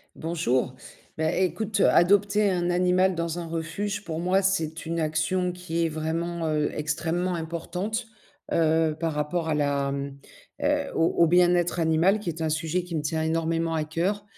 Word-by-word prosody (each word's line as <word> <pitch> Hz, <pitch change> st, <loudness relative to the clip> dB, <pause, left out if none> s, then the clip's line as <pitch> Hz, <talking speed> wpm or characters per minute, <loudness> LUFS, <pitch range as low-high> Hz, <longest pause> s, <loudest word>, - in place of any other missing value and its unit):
Bonjour, 130 Hz, -6 st, -1 dB, 0.4 s
bah, 160 Hz, 0 st, +1 dB
écoute 205 Hz, +3 st, 0 dB
adopter 200 Hz, +3 st, +4 dB
un 175 Hz, -1 st, 0 dB
animal 180 Hz, +1 st, +3 dB
dans 170 Hz, +1 st, -2 dB
un 170 Hz, -, -5 dB
refuge 170 Hz, +6 st, -3 dB
pour 160 Hz, -4 st, -4 dB
moi, 185 Hz, +3 st, +2 dB
c'est 165 Hz, -5 st, 0 dB
une 165 Hz, +1 st, -2 dB
action 165 Hz, +4 st, 0 dB
qui 175 Hz, -2 st, -2 dB
est 165 Hz, -, 0 dB
vraiment, 165 Hz, +2 st, -2 dB
heu, 150 Hz, -1 st, +1 dB
extrêmement 165 Hz, +4 st, -1 dB
importante, 175 Hz, +7 st, -3 dB, 0.5 s
heu, 160 Hz, -1 st, +2 dB
par 165 Hz, -1 st, -1 dB
rapport 160 Hz, +3 st, -2 dB
à 155 Hz, -, +1 dB
la 140 Hz, -1 st, 0 dB
mmh 140 Hz, 0 st, -4 dB, 0.4 s
heu, 290 Hz, -1 st, 0 dB
au 165 Hz, -, +3 dB, 0.2 s
au 170 Hz, -, +5 dB
bien-être 175 Hz, 0 st, +3 dB
animal 165 Hz, +5 st, +3 dB
qui 205 Hz, -, -4 dB
est 165 Hz, 0 st, -5 dB
un 160 Hz, -, 0 dB
sujet 160 Hz, +3 st, -1 dB
qui 175 Hz, -1 st, -6 dB
me 155 Hz, -, 0 dB
tient 160 Hz, +1 st, -1 dB
énormément 165 Hz, 0 st, 0 dB
à 155 Hz, -1 st, 0 dB
cœur. 180 Hz, +6 st, -1 dB
165 Hz, 170 wpm, -26 LUFS, 160-180 Hz, 0.5 s, au